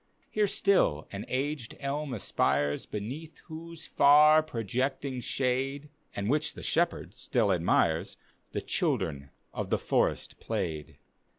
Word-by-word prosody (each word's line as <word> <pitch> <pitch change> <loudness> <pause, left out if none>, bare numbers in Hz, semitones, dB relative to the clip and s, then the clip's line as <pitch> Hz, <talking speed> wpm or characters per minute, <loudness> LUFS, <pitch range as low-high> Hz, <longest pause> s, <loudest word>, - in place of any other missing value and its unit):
Here 210 -1 +2
still 190 - +2
an 100 0 -5
aged 135 -2 -3
dm 145 +2 -2
a^ires, 75 - 0
Beneath 130 +10 -6
whose 165 0 -9
far 150 +2 +6
projecting 130 0 -2
shade, 135 +4 -1 0.3
(And 100 0 -2
which 150 +5 0
the - - -9
shepherd 170 0 0
stiU 110 -6 +1
admires,) 85 -2 +1 0.3
The - - -3
children 70 -1 -1 0.2
of - - -4
the - - +2
forest - - 0
played. 75 -2 -4
135 Hz, 120 wpm, -29 LUFS, 105-155 Hz, 0.3 s, far